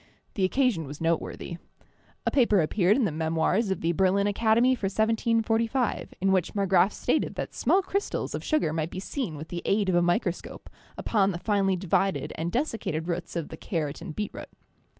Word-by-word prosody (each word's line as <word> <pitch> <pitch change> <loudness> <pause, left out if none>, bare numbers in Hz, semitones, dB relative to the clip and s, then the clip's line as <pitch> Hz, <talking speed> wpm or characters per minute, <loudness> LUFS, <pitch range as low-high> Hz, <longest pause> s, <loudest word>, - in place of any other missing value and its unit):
The 195 - +1
occasion 210 - +1
was 145 +2 -8
noteworthy. 165 +1 -2 0.7
A - - +1
paper 230 -7 +4
appeared 190 +6 +2
in 260 - +2
the 185 - 0
memoirs 160 +7 0
of 190 - -2
the 165 - +1
Berlin 190 +3 +2
Academy 225 +4 +3
for 230 -6 -3
1745, 225 +3 0
in 190 +1 +2
which 185 0 +1
Marggraf 195 -1 +3
stated - - -1
that - - -4
small 390 - +2
crystals 395 +1 -2
of - - -4
sugar 305 - +1
might 160 0 -1
be 185 - -6
seen 195 - -4
with'the 165 +3 -6
aid 200 -1 +1
of 180 - +2
a 175 - +4
microscope 175 +1 -2 0.3
upon 200 -3 +2
the 180 - -2
finely 195 0 +1
divided 190 +1 0
and 165 +2 -3
desiccated 225 - -2
roots 175 0 -4
of 165 -3 -3
the - - -8
carrot 155 -5 -3
and 165 -3 -7
beetroot. 210 - -5
195 Hz, 180 wpm, -27 LUFS, 170-220 Hz, 0.7 s, paper